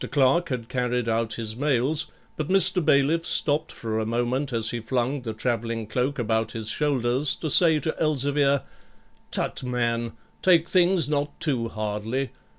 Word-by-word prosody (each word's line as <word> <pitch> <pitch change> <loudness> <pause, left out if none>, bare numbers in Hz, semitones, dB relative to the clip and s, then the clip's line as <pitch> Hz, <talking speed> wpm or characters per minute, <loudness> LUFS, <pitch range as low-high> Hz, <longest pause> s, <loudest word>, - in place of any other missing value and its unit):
Clerk 135 +5 +2
had 125 -4 -4
carried 125 -1 -2
out 115 -1 -1
his 110 -2 -5
mails, 145 +2 0 0.3
but 155 - -4
Mr. 185 -1 +7
Bailiff 145 +4 +2
stopped 155 -1 +1
for 110 -1 -4
a - - -1
moment 120 +4 -1
as 115 -2 0
he 120 - -3
flung 125 +4 -2
the 115 -2 -5
travelling 115 0 -3
cloak 125 +6 -2
about 110 -2 -1
his 110 -2 -5
shoulders 130 0 0
to 155 - -4
say 160 -1 +5
to 160 - -2
Elzevir, 145 -2 +1 0.7
'Tut, - - -3
man, 120 -2 -2 0.3
take 170 -3 +4
things 180 -3 +2
not 145 0 -2
too 125 -7 -1
hardly. 110 +4 -3
130 Hz, 155 wpm, -24 LUFS, 115-150 Hz, 0.7 s, Mr